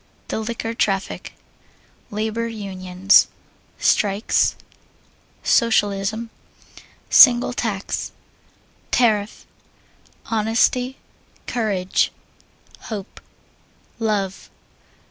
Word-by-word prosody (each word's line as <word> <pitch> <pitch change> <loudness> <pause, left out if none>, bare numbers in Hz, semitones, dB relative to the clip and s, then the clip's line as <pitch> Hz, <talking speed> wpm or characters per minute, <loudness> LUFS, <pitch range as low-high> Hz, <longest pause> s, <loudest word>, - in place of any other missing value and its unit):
The - - -2
Liquor 225 0 -4
Traffic. 195 -4 -2 0.8
Labor 220 +2 -2
Unions. 195 -3 +2 0.5
Strikes. 205 +1 +2 0.9
Socialism. 220 -1 +1 0.8
Single 245 -2 +7
Tax. 205 -5 -3 0.8
Tariff. 215 -3 +1 0.9
Honesty. 230 +4 +1 0.5
Courage. 200 -6 0 0.8
Hope. 205 -3 -7 0.8
Love. 205 -4 -2
215 Hz, 55 wpm, -21 LUFS, 195-230 Hz, 0.9 s, Single